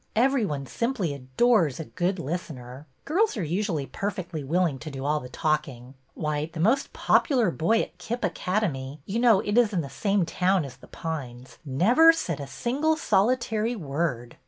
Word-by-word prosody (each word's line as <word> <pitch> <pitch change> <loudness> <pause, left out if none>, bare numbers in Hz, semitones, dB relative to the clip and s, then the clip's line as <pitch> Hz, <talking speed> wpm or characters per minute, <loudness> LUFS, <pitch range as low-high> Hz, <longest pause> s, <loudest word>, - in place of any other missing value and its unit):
Every 255 0 +3
one 140 -3 -3
simply 230 - -1
adores 145 - +2
a 160 - -4
good 180 +5 -1
listener. 145 -4 -6 0.2
Girls 385 - +1
are 195 - -1
usu 190 +6 -1
ally 145 -3 -2
perfectly 180 -3 -4
willing 160 -1 0
to 155 - -7
do 135 -1 -6
all 150 +1 +1
the 125 - -9
talking. 135 -4 -2 0.2
Why, 150 0 -2
the 160 - -7
most 230 +11 +2
popular 245 - +2
boy 195 +9 +2
at - - -11
Kip 240 +3 -4
Academy 155 -8 -2
— - - -42
you 215 +4 -2
know 230 -5 +5
it 210 +3 +2
is 225 -3 +2
in 175 - +1
the 140 - -7
same 200 -3 +1
town 180 0 +1
as 130 -3 -10
The - - -16
Pines 130 -6 -6
— - - -36 0.2
never 320 +8 +8
said 170 - -3
a 140 - -6
single 290 - 0
solitary 235 -2 +1
word. 140 - -3
175 Hz, 185 wpm, -26 LUFS, 145-225 Hz, 0.2 s, never